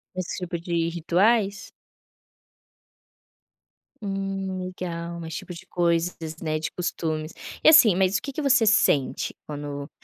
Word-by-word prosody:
Esse 185 -1 -4
tipo 175 -1 -4
de 170 -1 -1
rituais? 195 +5 +1 2.3
Hum, 195 -1 -3
legal, 170 -2 -5
mais 160 0 -7
tipo 180 - -6
de 170 - -11
coisas, 170 0 +1 0.2
né, 155 -1 -1
de 155 - -3
costumes. 160 -3 -3 0.3
E, - - +8
assim, 240 - +8
mas 190 +1 +2
o - - -6
que 280 - -6
que 305 - -3
você 275 -5 +4
sente 205 - +2
quando 145 -1 -6
180 Hz, 130 wpm, -25 LUFS, 165-195 Hz, 2.3 s, E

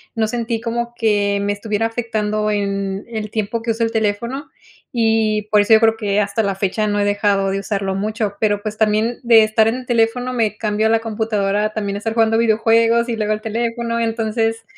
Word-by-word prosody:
no 220 -1 +1
sentí 230 0 -2
como 235 +1 -3
que 205 -3 +1
me 205 0 0
estuviera 210 +1 -2
afectando 215 -2 -2
en, 200 -1 -2
el 220 -2 -5
tiempo 225 +1 -2
que 230 0 -1
uso 230 +1 -1
el 225 - 0
teléfono. 225 +6 -2 0.4
Y 220 -3 +1
por 210 -1 +5
eso 220 +2 +3
yo 220 - +8
creo 225 0 +3
que 205 -2 0
hasta 200 +2 0
la 195 -1 -1
fecha 200 +2 -1
no 205 0 0
he 205 - +1
dejado 205 -1 +1
de 195 - -1
usarlo 195 -1 -2
mucho, 215 0 -2
pero 205 -2 +1
pues, 215 0 -5
también 220 +2 +1
de 230 -2 +6
estar 220 0 +2
en 225 - +1
el 255 0 -7
teléfono 240 +2 +1
me 220 -3 0
cambio 215 0 0
la 225 0 +3
computadora 215 -2 -1
también 200 -2 -3
a - - -3
estar 225 +1 -3
jugando 225 -1 +2
videojuegos 230 +1 +3
y 230 - -1
luego 215 -1 0
el 215 - -4
teléfono, 230 +1 -2
entonces, 225 0 -1
220 Hz, 205 wpm, -19 LUFS, 205-230 Hz, 0.4 s, yo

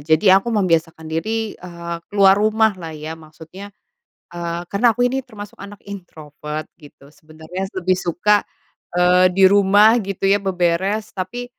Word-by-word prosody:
jadi 160 +6 +4
aku 235 - -7
membiasakan 165 -7 0
diri, 215 +8 -3
eee, 170 -1 -8
keluar 195 -1 +5
rumahlah 210 -7 0
ya 155 +1 -7
maksudnya 160 +5 -12 0.7
eee, 170 0 -4
karena 225 +3 +2
aku 245 - +1
ini 260 +2 0
termasuk 210 -5 -12
anak 200 +1 -11
introvert 155 -5 -8 0.2
gitu 145 -2 -17
sebenernya 155 +5 -8
lebih 185 0 +1
suka, 205 +5 +1 0.5
eee, 180 +1 +4
di 195 - +3
rumah 205 +2 +5
gitu 195 -1 -4
ya 200 - +3
beberes. 190 +3 -1
Tapi 200 +6 -5
185 Hz, 140 wpm, -19 LUFS, 165-205 Hz, 0.7 s, keluar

